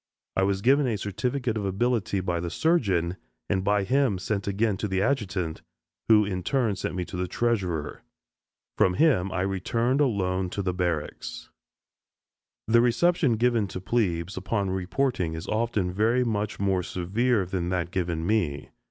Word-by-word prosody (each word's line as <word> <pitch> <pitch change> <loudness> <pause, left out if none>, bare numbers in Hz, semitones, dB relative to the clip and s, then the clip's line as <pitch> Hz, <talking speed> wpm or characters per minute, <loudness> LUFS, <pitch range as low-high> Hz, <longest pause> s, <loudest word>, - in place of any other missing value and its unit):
I - - +2
was 95 0 0
given 140 +2 +4
a 115 -4 0
certificate 120 +4 -2
of 105 - -2
ability 100 0 0
by 85 -2 -1
the 85 0 -3
surgeon, 95 - +1 0.3
and 95 -2 0
by 100 0 +2
him 130 -1 +2
sent 100 +2 -3
again 100 +1 +1
to 105 - -2
the 95 -1 -1
adjutant, 95 - -1 0.5
who 105 -2 +6
in 95 -2 -3
turn 120 0 +1
sent 95 - -4
me 90 -1 -2
to - - -8
the 90 0 -2
treasurer. 95 -8 -1 0.8
From 90 - +4
him 100 - +3
I 95 - -1
returned 115 +8 0
alone 95 -8 0
to 100 - -3
barracks. 85 -4 -3 1.2
The 115 +1 +5
reception 135 +3 +3
given 115 -2 +2
to 95 - -6
"plebes" 95 -4 -1
upon 100 0 -1
reporting 95 -1 -1
is 80 +2 -6
often 110 -5 0
very 115 +6 +2
much 105 -3 -2
more 95 -2 +1
severe 100 +5 0
than 90 -1 -2
that 90 -1 -1
given 85 -3 -2
me. 90 -9 0
100 Hz, 160 wpm, -26 LUFS, 90-115 Hz, 1.2 s, who